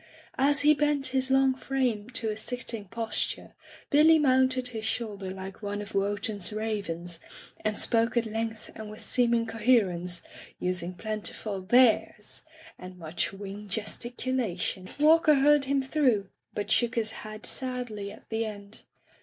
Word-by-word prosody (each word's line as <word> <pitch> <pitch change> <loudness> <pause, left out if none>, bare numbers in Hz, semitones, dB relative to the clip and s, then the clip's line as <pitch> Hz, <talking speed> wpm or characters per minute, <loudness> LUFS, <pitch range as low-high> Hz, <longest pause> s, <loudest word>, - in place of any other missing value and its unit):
As 285 +1 +4
he 300 +1 +6
bent 295 -2 +1
his 260 0 +1
long 265 0 +4
frame 255 -5 -1
to 230 -3 -2
a 215 - -2
sitting 230 -1 -4
posture, 225 +2 -3 0.4
Billy 315 +2 +7
mounted 260 -3 +3
his 225 -3 -5
shoulder 210 -4 -2
like 190 +2 -8
one 205 0 -3
of 205 - -7
Wotan's 205 -1 -1
ravens, 200 -6 -4 0.4
and 215 -1 -1
spoke 230 +1 +2
at 235 - +2
length 225 0 -4
and 220 -1 -8
with 215 - -11
seem 240 -2 +2
ing 230 0 +1
coherence, 205 -7 +1 0.4
using 180 0 -1
plentiful 215 -1 -3
"There's" 220 0 +2 0.4
and 180 0 -10
much 165 -1 -2
wing 200 +1 -8
gesticulation. 220 -3 -2
Walker 310 +1 +6
heard 285 +1 +4
him 275 0 +1
through, 255 -8 +1 0.3
but 205 - -3
shook 240 0 +2
his 220 -2 0
head 215 0 -7
sadly 245 -6 -3
at - - -14
the 225 0 -1
end. 205 -2 -9
220 Hz, 145 wpm, -28 LUFS, 205-255 Hz, 0.4 s, Billy